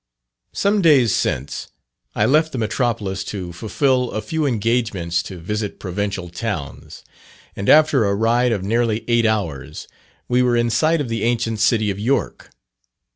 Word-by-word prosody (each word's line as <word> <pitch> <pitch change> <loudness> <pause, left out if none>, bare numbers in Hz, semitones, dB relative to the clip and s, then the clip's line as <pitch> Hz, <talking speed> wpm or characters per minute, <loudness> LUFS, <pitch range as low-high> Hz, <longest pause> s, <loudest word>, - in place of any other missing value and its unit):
Some 200 +1 +1
days 140 - +5
since, 65 +3 -2 0.5
I - - +2
left 155 +3 +2
the - - -3
Metropolis 110 -4 -1
to 90 -4 -6
fulfil 125 - 0
a 110 - -2
few 160 -2 -1
engagements 110 -7 0
to 95 - -9
visit 105 +4 -4
provincial 95 -1 -3
towns; 85 -5 -6 0.5
and 100 - -2
after 150 -6 +5
a 100 0 +1
ride 120 +3 +2
of 100 -5 -1
nearly 115 +1 0
eight 120 -1 +3
hours, 85 -12 -3 0.4
we 125 0 +2
were 125 -1 +2
in 120 0 +1
sight 155 +7 +2
of 140 - -3
the 115 -2 -2
ancient 115 -1 0
city 110 -1 +2
of 100 - -6
York. 120 -1 -1
115 Hz, 155 wpm, -20 LUFS, 100-125 Hz, 0.5 s, days